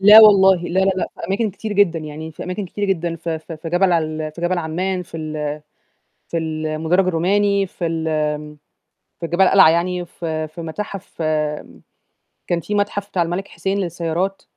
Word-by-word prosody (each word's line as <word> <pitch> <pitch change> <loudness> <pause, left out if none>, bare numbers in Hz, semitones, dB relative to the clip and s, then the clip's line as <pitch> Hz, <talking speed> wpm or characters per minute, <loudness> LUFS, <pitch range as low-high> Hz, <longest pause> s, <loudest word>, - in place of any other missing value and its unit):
لا 210 +3 +10
والله، 195 -3 +7
لا، 185 +2 +1
لا، 190 0 +3
لأ، 185 - 0
في - - -4
أماكن 210 +3 0
كتير 210 +3 -5
جدًا، 195 -5 +3
يعني 155 +1 -7
في - - -8
أماكن 185 +2 -3
كتير 205 +3 -3
جدًا 170 -4 -1
في 165 0 -3
في 160 +1 -9
في 160 +2 -7
جبل 180 +2 +3
ال 155 -2 -1
في 170 - -10
جبل 175 +1 0
عمان، 180 +3 -2
في 170 - -10
ال 155 -2 -3 0.7
في 170 - -1
ال 155 -1 -3
المُدرَّج 160 +4 +1
الروماني، 195 +3 +2
في 180 -1 -4
ال 165 -1 -2 1.2
في 170 - -2
جبل 175 +3 +2
القلعة، 190 -2 +7
يعني 175 +2 0
في 160 -2 -4
في 155 +3 -10
متاحف 190 +2 -6 1.2
كان 175 -1 0
في 210 - -3
متحف 205 0 -1
بتاع 180 - 0
الملك 175 +4 -3
حسين 195 +1 -2
للسيارات 175 +1 -2
175 Hz, 180 wpm, -20 LUFS, 160-195 Hz, 1.2 s, لا